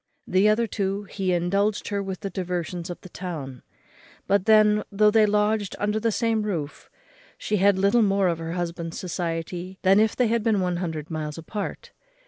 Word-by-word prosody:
The 190 +3 +3
other 225 +2 +2
two 200 -2 -2
he 195 -1 -2
indulged 195 +4 0
her 200 -1 -1
with 190 -2 -5
the 195 -2 -4
diversions 180 -1 -4
of 175 - -6
the 185 - -12
town; 155 -9 -6 0.6
but 200 -1 +2
then, 215 -1 +5
though 210 +1 +4
they 215 -1 +5
lodged 210 0 +1
under 210 +1 0
the 230 +1 +1
same 225 0 +1
roof, 170 -9 -4 0.5
she 210 - -1
had 200 0 +4
little 200 +5 +3
more 195 -2 +3
of 170 -2 -1
her 165 0 -4
husband's 170 -1 -4
society 175 +1 -4
than 195 +2 +5
if 220 0 +2
they 250 - +2
had 230 0 +1
been 220 -2 +2
one 180 -1 0
hundred 160 -3 -4
miles 155 -1 -4
apart. 200 +6 -6
195 Hz, 185 wpm, -25 LUFS, 175-210 Hz, 0.6 s, then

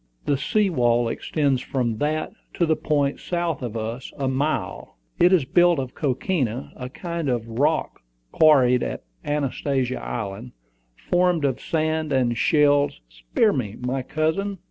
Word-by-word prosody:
The 145 - +2
sea 195 +8 +1
wall 120 -5 +2
extends 140 +2 0
from 120 -6 -2
that 155 +1 -1 0.2
to 170 - +2
the 160 -1 +2
point, 145 -3 0
south 170 -4 -2
of 115 -2 -4
us, 115 +3 -5
a 135 - -1
mile: 135 - -2 0.2
it 175 +1 +6
is 175 -8 +4
built 175 +3 +4
of 130 -2 -4
coquina, 130 - -2
a 125 0 -6
kind 170 +1 -4
of 120 -2 -1
rock 145 +8 0 0.3
quarried 130 -6 +5
on - - -3 0.3
Anastasia 135 -3 -1
Island, 110 +1 -5 0.4
formed 175 - +1
of 130 -2 -1
sand 155 -1 -1
and 125 -3 +2
shells 145 - +3
" - - -44
"Spare - - +1
me, 110 -7 -3 0.3
cousin!" 190 +6 -1
140 Hz, 145 wpm, -23 LUFS, 125-160 Hz, 0.4 s, it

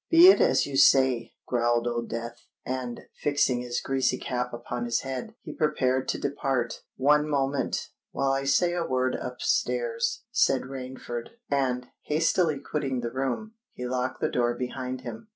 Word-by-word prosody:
"Be 340 +2 +9
it 385 - +6
as - - +4
you 140 -1 -3
say," 130 -3 +4
growled 120 -1 +1
Old 120 -1 -2
Death; 115 +1 -6 0.2
and, 125 -2 -4 0.2
fixing 140 -4 +2
his 120 -1 -2
greasy 130 -1 0
cap 125 0 -3
upon 120 0 -4
his 120 0 0
head, 135 - -5
he 150 - -7
prepared 130 -4 +1
to - - -1
depart. 135 -4 -1
"One 150 +3 +3
moment—while 135 -1 -1
I 135 0 0
say 175 +5 +3
a 175 -1 0
word 130 -3 0
up 125 0 -6
stairs," 475 -1 0
said 135 - +3
Rainford; 130 -2 -6 0.2
and, 125 -3 0
hastily 160 0 +2
quitting 140 -3 -2
the 120 -1 -3
room, 135 - -2 0.2
he 125 - -6
locked 125 +1 -2
the - - +1
door 120 -1 +1
behind 130 +1 -4
him. 120 - -8
130 Hz, 160 wpm, -27 LUFS, 125-145 Hz, 0.2 s, Be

